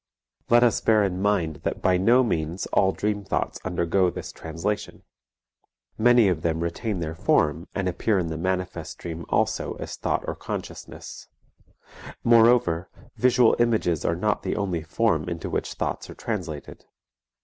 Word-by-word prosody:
Let 120 +1 +6
us 120 - +3
bear 110 -2 +4
in 95 -1 -1
mind 90 -7 +1
that - - -3
by 90 -1 +4
no 120 +8 +4
means 85 -5 -2
all 95 - +4
dream 105 +1 -2
thoughts 95 - -2
undergo 90 +1 +1
this - - -7
translation; 85 +6 -4 0.9
many 120 -1 +5
of 90 -4 0
them 80 0 -1
retain 90 +3 -2
their 80 -1 -3
form 80 +1 +1
and 95 -2 -1
appear 100 +4 +1
in 90 - 0
the 80 - -4
manifest 90 +2 -3
dream 85 -1 -7
also - - 0
as - - -6
thought - - -1
or - - -1
consciousness; - - -7 1.0
moreover, 115 -7 +4 0.3
visual 125 -2 +4
images 110 -9 +1
are 85 - +1
not 105 +4 0
the - - -2
only 95 -5 -1
form 80 0 0
into 85 -2 -5
which - - -2
thoughts - - -3
are - - -9
translated. 90 -10 -5
95 Hz, 155 wpm, -25 LUFS, 85-110 Hz, 1.0 s, Let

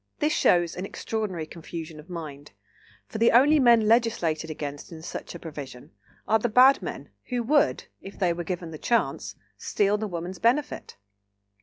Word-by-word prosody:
This 300 0 +1
shows 175 -1 +3
an 180 - -5
extraordinary 195 -4 -4
confusion 160 -1 -8
of 155 +4 -14
mind; 150 - -8 0.5
for 220 - -7
the 230 - +5
only 290 +6 +5
men 240 -3 +6
"legislated 215 -9 +1
against" 145 -1 -6
in 160 -1 -10
such 170 - -7
a - - -7
provision 145 -6 -9 0.4
are 220 +1 +3
the 240 - -1
bad 255 +5 +6
men, - - -7 0.2
who 245 -2 -2
would, 290 +5 +2 0.2
if 195 - -10
they 180 -3 +1
were 175 0 -5
given 170 -1 -5
the 155 - -8
chance, 235 -1 -1 0.2
steal 205 0 +1
the 215 - -2
woman's 175 0 -6
benefit. 275 +6 0
185 Hz, 170 wpm, -26 LUFS, 160-230 Hz, 0.5 s, men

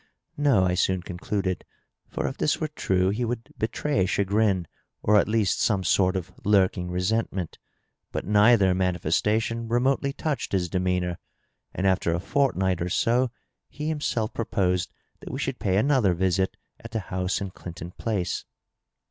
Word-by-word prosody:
No,l 105 -12 +3
soon 95 0 +1
concluded; 95 +1 -3 0.5
for - - -3
if 135 - -4
this 150 - +1
were 155 - -2
true 95 -10 +1
he 115 +5 -1
would 120 0 -4
betray 110 -2 0
chagrin, 100 -1 +1 0.4
or 105 - +4
at - - +1
least 110 -3 +1
some 100 -3 +2
sort 95 +2 +3
of 95 0 -3
lurking 95 -3 +2
resentment. 90 0 -1 0.5
But - - -3
neither 105 -1 +5
manifestation 100 +6 0
remotely 130 +4 +1
touched 150 -3 -3
his 90 -2 +1
demeanor, 90 -1 -1 0.5
and 95 - -3
after 95 -3 +2
a - - -1
fortnight 95 -7 +1
or 90 - -1
so 125 +6 +2 0.4
he 150 +1 -4
himself 135 -8 -1
proposed 90 -5 0 0.3
that - - -9
we - - -4
should - - -3
pay 95 -1 +1
another 110 -6 +3
visit 95 +1 0 0.2
at 115 - -9
the 110 -1 -2
house 90 0 0
in 95 -2 -4
Clinton 85 -1 -8
Place. 95 -4 -2
95 Hz, 150 wpm, -26 LUFS, 90-115 Hz, 0.5 s, neither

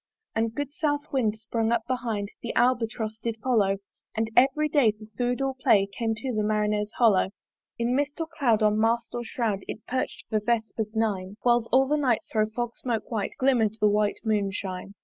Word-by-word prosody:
And 225 0 +1
a 225 - -9
good 290 -1 -3
south 295 -1 -1
wind 225 -6 +1
sprung 225 +1 -1
up 235 -1 +1
behind, 235 -5 -2
The 235 - -4
Albatross 225 -3 +1
did 230 0 -3
follow; 215 -5 +2 0.4
And 220 0 -1
every 275 +4 +4
day 280 -8 +3
for 215 0 -13
food 245 +2 0
or 270 0 0
play 210 -6 +3
Came 225 0 -1
to 250 +4 -4
the 215 - 0
Marinere's 210 0 0
hollo! 210 -6 +4 0.5
In 235 +2 0
mist 285 +3 -1
or 325 - 0
cloud 270 -9 +1
on 210 0 +3
mast 230 +1 +1
or 240 - -3
shroud 225 -4 -1
It 220 - -7
perch'd 255 +1 -3
for 215 - +1
vespers 220 -1 -1
nine, 205 -3 -1
Whiles 240 -1 +3
all 265 +1 +5
the 300 +2 +2
night 255 -6 +2
thro' 215 -1 +2
fog 240 +1 -3
smoke 235 -2 -3
white 215 -4 -2
Glimmer'd 240 -5 +2
the 210 - +4
white 210 0 +1
moon 210 -3 +1
shine. 190 0 -5
225 Hz, 200 wpm, -26 LUFS, 215-250 Hz, 0.5 s, all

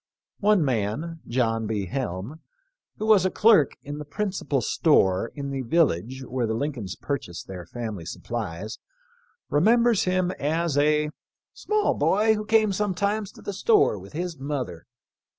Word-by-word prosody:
One 205 -5 +3
man, 135 +8 -2
* - - -30
who 120 - -3
was 215 -4 +5
a 185 - +2
clerk 210 -8 +4
in 145 +1 -6
the 150 - -6
principal 185 - -2
store 105 - +2
in 140 -2 -4
the 135 -1 -2
village 130 - +1
where 125 -2 -2
the 110 - -1
Lincolns 120 -8 -3
purchased 105 - -5
their 90 -3 -8
family 110 -7 -5
supplies, 85 +9 -5 0.7
remembers 230 +7 +4
him 185 0 +1
as 160 +1 0
a 150 +1 +2 0.2
" - - -66
small 425 0 +1
boy 215 +3 +3
who 215 0 -3
came 215 -2 +3
sometimes 205 +1 -1
to - - -15
the 205 - -4
store 415 - +3
with 95 +6 -13
his 170 -1 -4
mother. 130 - -4
150 Hz, 145 wpm, -25 LUFS, -, 0.7 s, was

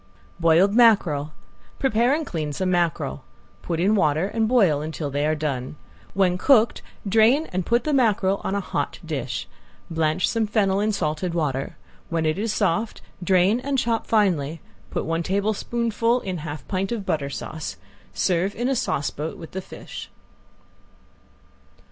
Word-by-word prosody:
~BOILED 170 +4 +4
MACKEREL~ 195 -11 +4 0.5
Prepare 245 +1 +2
and 315 0 -3
clean 155 - -3
some 185 +4 -1
mackerel. 170 - 0 0.4
Put 165 -2 -3
in 195 +5 +3
water 160 -2 +2
and 225 +1 0
boil 195 - +3
until 155 -1 -4
they 145 +2 0
are 155 - +1
done. 140 -3 -3 0.4
When 180 -2 +2
cooked, 235 -3 +4 0.3
drain 225 +9 +4
and 185 -1 -2
put 235 +1 +2
the 305 - -1
mackerel 205 -7 +2
on 195 - -1
a 200 - 0
hot - - -3
dish. - - -4 0.4
Blanch 160 +1 +1
some 225 -2 0
fennel 200 -2 +2
in 215 +1 +1
salted 170 -2 -2
water. 135 -5 -2 0.3
When 165 -1 0
it 155 +4 0
is 220 +1 0
soft 210 +1 0 0.2
drain 185 +5 +3
and 275 +1 -1
chop 230 -2 0
finely. 165 -8 +1 0.3
Put - - -3
one 165 +1 -1
tablespoonful 230 +5 0
in 185 -3 -4
half 150 -2 -7
pint 195 +1 -2
of 220 -4 -3
butter 140 -6 -1
sauce. 145 - -6 0.3
Serve 185 +2 0
in 240 +3 -1
a 270 - +1
sauce 145 - -1
boat 155 +2 -5
with 165 - -10
the 190 - -4
fish. - - -9
190 Hz, 160 wpm, -24 LUFS, 160-220 Hz, 0.5 s, ~BOILED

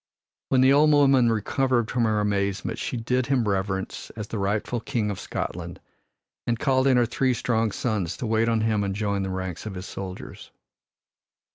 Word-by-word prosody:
When 130 - +4
the 130 +1 +6
old 150 +2 +5
woman 135 -5 +5
recovered 120 +2 0
from 120 -2 +1
her 110 -1 +1
amazement 100 -2 -1
she - - -3
did 125 +2 0
him 125 -5 +1
reverence 95 -1 -2
as 105 -1 -6
the 110 - -3
rightful 105 +4 -1
King 110 -2 -2
of 100 - -6
Scotland - - -5 0.7
and 120 -1 +1
called 130 +1 +2
in 130 -2 +4
her 120 - +4
three 125 +2 0
strong 115 -2 0
sons 100 -8 -2
to - - -4
wait 115 +1 +2
on 115 -1 +1
him 110 -2 +1
and 100 -1 -2
join 100 -1 -1
the 95 - -2
ranks 95 +1 -4
of 100 - -6
his 90 +1 -6
soldiers. 95 -1 -8
110 Hz, 185 wpm, -25 LUFS, 100-125 Hz, 0.7 s, the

